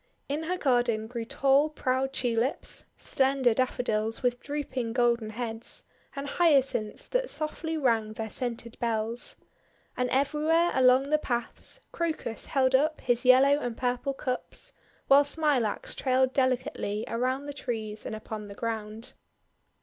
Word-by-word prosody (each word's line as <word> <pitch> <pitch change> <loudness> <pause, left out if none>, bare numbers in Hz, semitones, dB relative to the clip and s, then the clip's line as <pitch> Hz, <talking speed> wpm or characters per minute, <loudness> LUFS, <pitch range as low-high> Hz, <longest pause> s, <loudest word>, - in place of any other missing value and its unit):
In 300 +3 -2
her 365 +2 -1
garden 240 -7 +1
grew 230 0 -5
tall 275 +3 +3
proud 265 -2 -1
Tulips, 245 0 -1
slen 270 0 +1
der 240 -2 +5
Daffodils 225 -2 0
with 245 0 +1
drooping 265 -5 -3
golden 235 -2 +2
heads, 225 0 -4 0.3
and 280 0 -4
Hyacinths 275 -10 +2
that - - -1
softly 320 +1 -3
rang 225 -6 +1
their 220 0 -5
scented 235 -2 -4
bells. 230 - 0 0.6
And 250 0 0
everywhere 305 +6 +2
along 260 +2 +4
the 305 - +4
paths, 245 - -3
Crocus 315 -9 -3
held 260 -2 +2
up 305 +4 +3
his 245 +1 0
yellow 270 +3 +6
and 240 -5 -4
purple 250 +2 -1
cups; 270 - -4 0.3
while 280 +1 +7
Smilax 285 -7 0
trailed 260 0 +1
delicately 255 -5 0
around 255 +4 -1
the 290 - -5
trees 220 -6 -4
and 220 - -5
upon 215 -1 -7
the 200 - -10
ground. 220 0 -4
255 Hz, 140 wpm, -28 LUFS, 230-280 Hz, 0.6 s, while